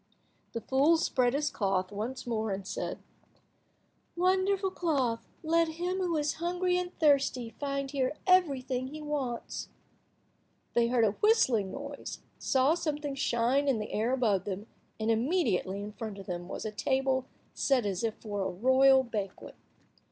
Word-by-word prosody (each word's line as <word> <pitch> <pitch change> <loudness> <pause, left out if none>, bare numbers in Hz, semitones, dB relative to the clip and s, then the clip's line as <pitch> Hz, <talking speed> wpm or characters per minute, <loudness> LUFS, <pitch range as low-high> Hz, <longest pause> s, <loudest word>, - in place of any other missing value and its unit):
The 230 - -3
fool 280 +8 +4
spread 250 -6 +1
his 295 +1 0
cloth 195 -2 0
once 225 +6 -4
more, 220 -2 -1
and 195 -1 -3
said— - - -4 1.1
"Wonderful 380 +2 +2
cloth, 270 -11 0 0.2
let 330 +1 +3
him 360 +2 -1
who 350 -3 0
is 295 -1 0
hungry 360 +1 +1
and 360 0 -4
thirsty 275 -6 +2
find 275 -1 -2
here 270 0 0
everything 270 -9 +2
he 305 +3 -8
wants." 285 -6 -4 1.0
They 235 -1 +3
heard 235 -1 +3
a 210 - +3
whistling 250 - +3
noise, 280 0 -6 0.2
saw 265 +3 +3
something 300 -4 -2
shine 265 +1 +1
in 270 -4 +3
the 210 0 -5
air 225 +4 +1
above 220 -8 +1
them, 200 +1 -4 0.3
and, 220 +1 +1
immediately, 225 - +1
in 210 - -6
front 215 -1 -6
of 195 - -9
them, 175 -1 -5
was - - -6
a 215 - -2
table 265 +3 0 0.3
set 260 -5 +2
as 195 -1 -2
if 225 -1 0
for 205 -2 -5
a 190 - 0
royal 260 +6 +5
banquet. 210 -6 -5
260 Hz, 155 wpm, -30 LUFS, 220-300 Hz, 1.1 s, royal